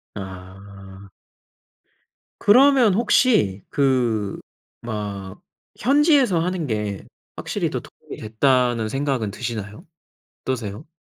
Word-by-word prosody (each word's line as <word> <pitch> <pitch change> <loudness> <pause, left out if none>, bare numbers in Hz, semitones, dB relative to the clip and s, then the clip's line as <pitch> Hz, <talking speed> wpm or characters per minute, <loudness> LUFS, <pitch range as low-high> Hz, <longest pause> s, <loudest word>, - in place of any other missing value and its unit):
아. 95 0 -10 1.3
그러면 250 -1 +5
혹시, 215 - +2
그 120 -7 0 0.4
막 100 -4 -6 0.4
현지에서 275 - +3
하는 175 0 -2
게 105 -5 -3 0.3
확실히 - - -2
더 - - -4
도움이 - - -12
됐다는 120 0 +1
생각은 135 -3 -1
드시나요? 105 -2 -6 0.6
어떠세요? 120 +1 -4
115 Hz, 195 characters per minute, -22 LUFS, 100-165 Hz, 1.3 s, 그러면